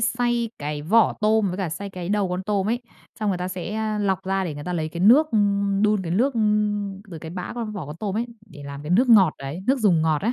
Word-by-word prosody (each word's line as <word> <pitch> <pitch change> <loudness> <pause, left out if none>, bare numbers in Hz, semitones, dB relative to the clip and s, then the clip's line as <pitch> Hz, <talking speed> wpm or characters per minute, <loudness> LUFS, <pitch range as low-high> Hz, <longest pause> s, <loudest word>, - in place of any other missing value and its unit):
xay 240 -1 0
cái 150 0 -4
vỏ 215 +8 +4
tôm 215 -1 +3
với 180 - -4
cả 190 -3 -1
xay 195 +6 -6
cái 180 -2 -6
đầu 205 -1 +1
con 180 +1 -3
tôm 200 0 -1
ấy, 240 +2 -1 0.4
xong 215 - 0
người 190 -3 0
ta 180 +1 -3
sẽ, 185 +2 -5
a, 215 -1 -1
lọc 190 -2 0
ra 190 0 0
để 160 - -4
người 145 0 -8
ta 180 - -3
lấy 160 -3 -2
cái 170 +2 -6
nước 265 - +6
ư, 220 - +2 0.4
đun 210 -2 +2
cái 170 - -5
nước, 255 +8 +2
ư, 230 - 0 0.7
từ 165 - -7
cái 160 +1 -8
bã 180 0 -5
con 230 -3 -4
vỏ 190 -8 -6
con 150 +2 -8
tôm 200 +2 -3
ấy 235 +2 -1 0.2
để 145 -8 -12
làm 140 0 -8
cái 150 - -6
nước 245 +8 +4
ngọt 195 -8 +6
đấy, 140 +5 -6
nước 265 +1 +3
dùng 185 -9 +3
ngọt 155 -2 +1
ấy, 230 +4 +1
195 Hz, 280 wpm, -23 LUFS, 170-220 Hz, 0.7 s, nước